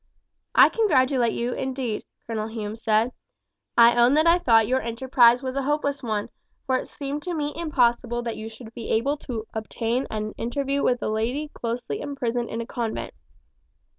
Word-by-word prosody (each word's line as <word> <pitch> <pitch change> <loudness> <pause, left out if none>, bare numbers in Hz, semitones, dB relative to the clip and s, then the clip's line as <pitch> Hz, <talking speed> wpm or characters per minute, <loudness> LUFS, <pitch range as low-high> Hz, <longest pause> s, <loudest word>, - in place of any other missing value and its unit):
"I - - +8
congratulate 260 - +2
you 240 +1 -2
indeed," 260 -4 -3 0.2
Colonel 220 -2 -3
Hume 220 -1 -5
said. 225 +1 +1 0.7
"I 235 0 +7
own 240 +3 +5
that 310 +1 +4
I 340 +1 +5
thought 225 -9 +4
your 260 +1 +1
enterprise 240 +1 +3
was 260 0 -3
a 275 - 0
hopeless 285 0 -1
one, 215 -4 -2 0.4
for 260 - +1
it - - -5
seemed 285 +1 -5
to 350 +2 -4
me 295 -1 -2
impossible 240 -7 +1
that 230 -1 -3
you 220 +1 -6
should 225 0 -12
be 230 -2 -7
able 275 +7 +1
to 230 -6 -6
obtain 225 +3 -2
an 215 0 -3
interview 275 +4 -1
with 245 0 +1
a - - -1
lady 245 +8 -1
closely 235 - -4
imprisoned 245 -4 -2
in 230 - -3
a - - -5
convent. 230 -2 -4
240 Hz, 175 wpm, -25 LUFS, 225-275 Hz, 0.7 s, I